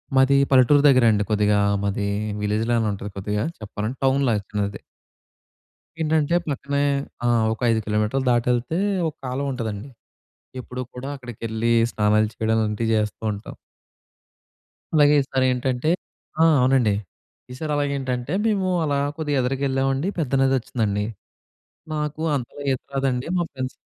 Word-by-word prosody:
మాది 135 Hz, +1 st, +5 dB, 0.2 s
పల్లెటూరు 135 Hz, +2 st, +6 dB
దగ్గరండి 115 Hz, -6 st, +4 dB
కొద్దిగా. 105 Hz, -1 st, +3 dB, 0.2 s
మాది 100 Hz, 0 st, -1 dB, 0.3 s
విలేజ్‌ 105 Hz, +2 st, 0 dB
లానే 115 Hz, -2 st, +2 dB
ఉంటది 100 Hz, +1 st, -7 dB
కొద్దిగా 105 Hz, +2 st, -2 dB
చెప్పాలంటే, 110 Hz, +3 st, -5 dB
టౌన్ 135 Hz, +1 st, +3 dB
లాగా 105 Hz, -2 st, +1 dB
చిన్నది. 100 Hz, -1 st, -2 dB, 1.2 s
ఏంటంటే 160 Hz, +1 st, +2 dB
పక్కనే 140 Hz, +1 st, -1 dB, 0.4 s
ఆ! -, -, +3 dB, 0.3 s
ఒక -, -, -10 dB
5 110 Hz, -, +2 dB
కిలోమీటర్లు 105 Hz, +5 st, 0 dB
దాటెళ్తే 120 Hz, +5 st, +1 dB, 0.3 s
ఒక 155 Hz, -, -5 dB
కాలవ 130 Hz, +3 st, -2 dB
ఉంటదండి. 115 Hz, -1 st, -4 dB, 0.7 s
ఎప్పుడూ 125 Hz, +1 st, -7 dB
కూడా 125 Hz, +2 st, -6 dB
అక్కడికెళ్ళి, 115 Hz, -2 st, -2 dB, 0.2 s
స్నానాలు 105 Hz, 0 st, +2 dB
చేయడం 110 Hz, 0 st, 0 dB
అలాంటియి 110 Hz, +1 st, -1 dB
జేస్తూ 105 Hz, 0 st, -1 dB
ఉంటాం. 100 Hz, +1 st, -8 dB, 1.4 s
అలాగే 145 Hz, -1 st, +6 dB
ఈసారేంటంటే 130 Hz, +1 st, 0 dB, 0.5 s
ఆ! -, -, +7 dB, 0.2 s
అవునండి. 125 Hz, -5 st, +3 dB, 0.6 s
ఈ -, -, -6 dB
సారి 155 Hz, -1 st, -3 dB
అలాగేంటంటే 140 Hz, -2 st, -2 dB
మేము 200 Hz, -4 st, +1 dB, 0.2 s
అలా 145 Hz, -2 st, 0 dB, 0.2 s
కొద్దిగా 150 Hz, -3 st, -1 dB
ఎదరకెళ్ళావండి 135 Hz, +3 st, 0 dB
పెద్ద 145 Hz, -5 st, -2 dB
నదొచ్చిందండి. 115 Hz, -6 st, 0 dB, 0.9 s
నాకూ 150 Hz, 0 st, -3 dB
అంతగా 135 Hz, +2 st, -5 dB
ఈత 130 Hz, -, -4 dB
రాదండి. 135 Hz, -2 st, 0 dB
మా 175 Hz, -, +2 dB
ఫ్రెండ్స్ 130 Hz, -1 st, -4 dB
125 Hz, 125 wpm, -23 LUFS, 110-140 Hz, 1.4 s, ఆ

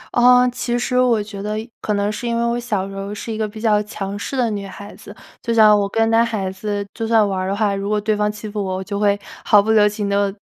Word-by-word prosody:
嗯， 250 Hz, +1 st, +6 dB
其 240 Hz, -1 st, -2 dB
实 250 Hz, +1 st, 0 dB
我 240 Hz, -4 st, +3 dB
觉 205 Hz, -2 st, -8 dB
得 210 Hz, +1 st, -3 dB
一 225 Hz, -, -7 dB
可 210 Hz, -, -1 dB
能 205 Hz, +1 st, 0 dB
是 240 Hz, +3 st, -5 dB
因 235 Hz, 0 st, 0 dB
为 235 Hz, -, 0 dB
我 235 Hz, +1 st, 0 dB
小 205 Hz, -5 st, -2 dB
时 195 Hz, -, -9 dB
候 195 Hz, +1 st, -5 dB
是 225 Hz, +1 st, -5 dB
一 -, -, -4 dB
个 215 Hz, -1 st, -1 dB
比 215 Hz, +1 st, -10 dB
较 215 Hz, -2 st, +2 dB
强 205 Hz, -2 st, -5 dB
势 270 Hz, -, -4 dB
的 245 Hz, -2 st, +2 dB
女 200 Hz, -1 st, -4 dB
孩 200 Hz, +1 st, -10 dB
子， -, -, -13 dB, 0.3 s
就 235 Hz, -, -3 dB
像 215 Hz, -2 st, +7 dB
我 200 Hz, -1 st, -1 dB
跟 225 Hz, +2 st, +1 dB
男 230 Hz, +1 st, +5 dB
孩 210 Hz, -5 st, -2 dB
子 205 Hz, +1 st, -4 dB
就 225 Hz, -1 st, -4 dB
算 225 Hz, -2 st, +4 dB
玩 190 Hz, -1 st, -2 dB
儿 185 Hz, -, -2 dB
的 195 Hz, -, -1 dB
话， 205 Hz, -1 st, +1 dB
如 195 Hz, +1 st, -3 dB
果 210 Hz, 0 st, +1 dB
对 215 Hz, +1 st, 0 dB
方 210 Hz, 0 st, 0 dB
欺 210 Hz, +1 st, -8 dB
负 210 Hz, -1 st, -3 dB
我， 190 Hz, -1 st, -3 dB
我 190 Hz, -, -4 dB
就 200 Hz, +1 st, -4 dB
会 205 Hz, -1 st, +2 dB, 0.2 s
毫 205 Hz, -, +5 dB
不 220 Hz, +2 st, +1 dB
留 210 Hz, -1 st, +5 dB
情 205 Hz, -1 st, -3 dB
地 200 Hz, 0 st, +1 dB
210 Hz, 315 characters per minute, -20 LUFS, 200-225 Hz, 0.3 s, 像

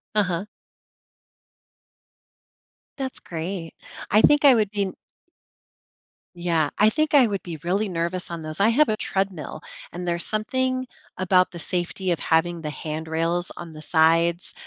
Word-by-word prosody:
Uh-huh. 190 Hz, -2 st, 0 dB, 2.5 s
That's 265 Hz, -2 st, -3 dB
great, 165 Hz, 0 st, -5 dB, 0.4 s
I 210 Hz, +3 st, +5 dB
think 295 Hz, +4 st, +5 dB
I 275 Hz, -3 st, +8 dB
would 215 Hz, -3 st, +1 dB
be 200 Hz, -2 st, -1 dB, 1.4 s
Yeah, 170 Hz, -3 st, +1 dB
I 210 Hz, -, +6 dB
think 310 Hz, +6 st, 0 dB
I 275 Hz, -4 st, +7 dB
would 200 Hz, -2 st, -2 dB
be 170 Hz, -3 st, -7 dB
really 195 Hz, +4 st, 0 dB
nervous 175 Hz, +1 st, -2 dB
on 170 Hz, -1 st, -5 dB
those, 155 Hz, +2 st, -7 dB
I 200 Hz, +3 st, +5 dB
have 270 Hz, +4 st, +4 dB
a 215 Hz, -, 0 dB
treadmill, 195 Hz, -6 st, -3 dB, 0.3 s
and 180 Hz, +1 st, -6 dB
there's 170 Hz, 0 st, -1 dB
something 255 Hz, +4 st, -1 dB, 0.3 s
about 185 Hz, 0 st, +3 dB
the 175 Hz, -, -8 dB
safety 180 Hz, +2 st, -2 dB
of 170 Hz, -, 0 dB
having 165 Hz, +1 st, +1 dB
the 155 Hz, -, -4 dB
handrails 160 Hz, +4 st, -2 dB
on 170 Hz, -2 st, -8 dB
the 155 Hz, -, -10 dB
sides 165 Hz, +2 st, +2 dB
180 Hz, 145 wpm, -24 LUFS, 165-210 Hz, 2.5 s, I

